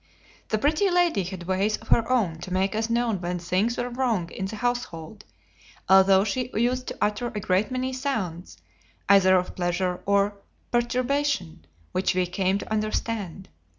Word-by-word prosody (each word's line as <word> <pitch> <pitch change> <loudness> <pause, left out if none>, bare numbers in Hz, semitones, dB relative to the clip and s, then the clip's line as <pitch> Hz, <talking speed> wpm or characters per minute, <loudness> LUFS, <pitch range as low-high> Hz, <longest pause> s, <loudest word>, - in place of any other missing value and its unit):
The 215 - +1
Pretty 305 - +2
Lady 350 - +2
had 185 -1 -6
ways 190 +4 0
of - - -17
her 230 0 +3
own 200 -11 +1
to 185 - -8
make 190 +1 +1
us 220 +1 -1
know 235 0 +1
when 180 -2 -3
things 185 +7 0
were 245 - -1
wrong 235 -9 -1
in 190 - -4
the 205 +3 -5
household, 215 -5 -4 0.6
although 190 0 +6
she 245 +4 -2
used 250 +3 0
to - - -5
utter 210 +3 0
a 215 - -4
great 190 +1 +1
many 255 0 -2
sounds, 220 - -3 0.5
either 190 -1 +6
of 180 0 -3
pleasure 180 0 -1
or 200 0 +2 0.3
perturbation, 245 - 0 0.3
which 185 0 0
we 185 -1 +2
came 185 +2 0
to 205 - -8
understand. 215 -3 -2
205 Hz, 165 wpm, -25 LUFS, 185-240 Hz, 0.6 s, although